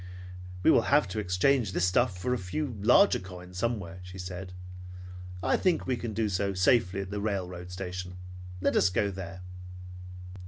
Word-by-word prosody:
"We - - +6
will - - +3
have 105 - +4
to 110 - -3
exchange 105 +3 +2
this 90 - +2
stuff 90 +1 +2
for 125 +8 -1
a - - +1
few 125 +8 -3
larger 200 - +5
coins 90 -1 -9
somewhere," 100 -7 -2
she 90 +1 -10
said. 90 0 -6 0.9
"I - - +3
think 180 -3 +1
we 130 - 0
can 120 -1 -4
do 110 0 0
so 100 0 -1
safely 95 0 +3
at 95 0 -7
the 105 0 -3
railroad 90 -4 -3
station. 90 0 -6 0.4
Let - - +1
us 90 - +4
go 100 +2 0
there." 95 -1 -7
95 Hz, 170 wpm, -29 LUFS, 90-105 Hz, 0.9 s, We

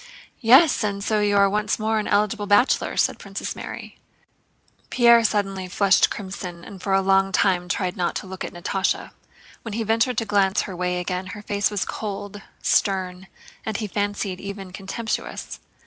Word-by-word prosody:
"Yes, 260 +4 +6
and 200 -1 -2
so 215 0 +1
you 205 -1 +2
are 200 0 +6
once 210 +1 0
more 220 0 0
an 210 - -3
eligible 205 0 +1
bachelor," 205 +6 +3
said - - +1
Princess - - -5
Mary. - - -8 0.9
Pierre 235 -1 +6
suddenly 195 -3 -1
flushed 195 +1 +3
crimson 185 -3 -7
and 195 -3 -11
for 195 +1 -1
a 195 0 +3
long 195 0 +3
time 180 -2 +2
tried 180 -1 -1
not 175 -1 -1
to - - -4
look 190 -1 -7
at - - -5
Natásha. 190 +2 -2 0.5
When 225 - -7
he 230 - -1
ventured 225 +2 +1
to 225 - 0
glance 200 -1 +2
her 190 - -6
way 180 0 -1
again 180 +1 -3
her 210 - -10
face 205 0 0
was 205 -3 -2
cold, 205 -1 -6 0.2
stern, 185 -1 0 0.4
and 220 -2 -3
he 220 - -3
fancied 205 -2 -2
even 200 -2 -7
contemptuous. 210 +4 -5
200 Hz, 175 wpm, -23 LUFS, 190-210 Hz, 0.9 s, Yes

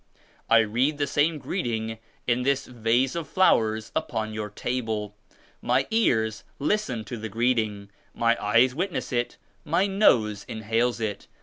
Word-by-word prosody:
I 115 0 +7
read 125 +7 +1
the 145 - 0
104 - - 0
same 155 +2 +2
greeting 115 - -3 0.3
in 125 0 +1
this 140 +1 +1
vase 120 +2 +1
of 165 -3 -3
flowers 110 - +2
upon 110 -1 -2
your 105 -1 -4
table. 110 -2 -3 0.5
My 130 +3 +2
ears 110 - +1
listen 145 - -1
to 115 +4 -6
the 110 0 -5
greeting, 110 -3 0 0.2
my 115 0 +3
eyes 115 +5 +4
witoess 180 +6 -3
it, 120 0 -1 0.3
my 170 +5 +2
nose 120 - +3
inhales 115 +2 0
it. 110 -3 -4
120 Hz, 145 wpm, -26 LUFS, 110-140 Hz, 0.5 s, I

